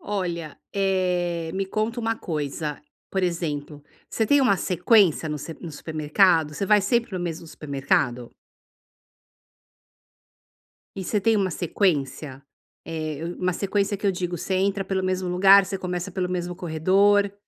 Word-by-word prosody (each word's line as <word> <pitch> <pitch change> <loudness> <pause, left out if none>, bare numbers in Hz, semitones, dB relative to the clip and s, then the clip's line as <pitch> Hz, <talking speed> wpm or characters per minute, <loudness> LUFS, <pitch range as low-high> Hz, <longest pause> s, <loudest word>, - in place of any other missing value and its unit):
Olha, 175 -6 -4 0.2
eh, 180 -4 0
me 195 0 -1
conta 220 +4 -2
uma 225 0 -1
coisa, 150 -4 -4 0.3
por 190 - -1
exemplo, 150 -4 -3 0.3
você 225 - 0
tem 285 +3 +4
uma 240 -7 +4
sequência 180 -3 +3
no 150 - -3
sep 160 +3 -8
no 170 -3 -7
supermercado? 155 +1 +2
Você 200 - -2
vai 210 +1 +5
sempre 230 +2 0
no 185 - -2
mesmo 170 -1 -4
supermercado? 135 -5 -1 2.7
E 190 - -4
você 205 +3 -1
tem 225 +3 +3
uma 195 -2 +1
sequência? 150 -6 -1 0.4
Eh, 155 -2 -4
eu 170 +1 -5
uma 185 0 0
sequência 200 +2 -1
que 205 - -3
eu 195 - +3
digo, 175 -1 -3
você 190 - -2
entra 195 +1 0
pelo 190 -1 -1
mesmo 185 0 -1
lugar, 195 +2 +6
você 195 +1 -3
começa 180 0 -4
pelo 180 -1 -2
mesmo 180 -1 -3
corredor. 195 +4 +2
180 Hz, 150 wpm, -24 LUFS, 160-195 Hz, 2.7 s, lugar